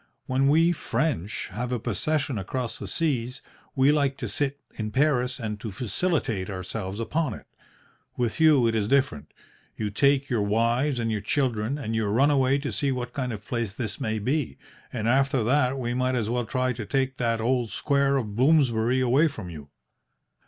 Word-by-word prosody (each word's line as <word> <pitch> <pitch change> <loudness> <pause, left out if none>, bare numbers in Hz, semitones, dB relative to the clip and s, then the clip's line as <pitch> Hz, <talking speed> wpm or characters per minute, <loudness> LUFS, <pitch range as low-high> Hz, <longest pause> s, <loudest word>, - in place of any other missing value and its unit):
When 135 +1 +1
we 165 +4 +5
French 120 - -2
have 120 +6 -4
a 125 - +1
possession 125 +3 -1
across 120 +5 -3
the - - -6
seas, 130 -6 -1 0.3
we 135 +1 +5
like 140 -2 +1
to - - -4
sit 140 -1 -2
in 110 -1 -4
Paris 130 0 +1
and 105 -3 -4
to 110 - -5
felicitate 120 - -1
ourselves 95 +1 -5
upon 145 +1 -1
it. - - -13 0.7
With 120 +1 -1
you 155 -6 +5
it 115 - +2
is 105 -2 0
different. 130 - +1 0.5
You 105 -1 -2
take 140 +5 +3
your 120 -5 0
wives 115 +7 +1
and 115 -1 -1
your 105 -2 -1
children, 120 +2 0
and 115 -6 -4
you 110 -2 0
run 130 +8 +3
away 135 -1 +3
to 140 0 -3
see 140 -1 0
what 125 -1 -4
kind 130 -2 -2
of 105 -2 -7
place 115 -5 -3
this 115 +3 -4
may 110 -4 -1
be, 125 - -1 0.3
and 115 -3 -2
after 135 0 +2
that 130 +2 +2
we 120 -2 -2
might 130 +1 0
as 115 -2 -1
well 120 -1 -1
try 130 +1 0
to 115 -2 -6
take 135 -1 0
that 115 -2 0
old 120 0 0
Square 140 +1 +1
of 105 -6 -3
Bloomsbury 130 -3 +3
away 130 +6 +4
from 110 - -7
you. 75 -3 -10
125 Hz, 190 wpm, -26 LUFS, 110-140 Hz, 0.7 s, we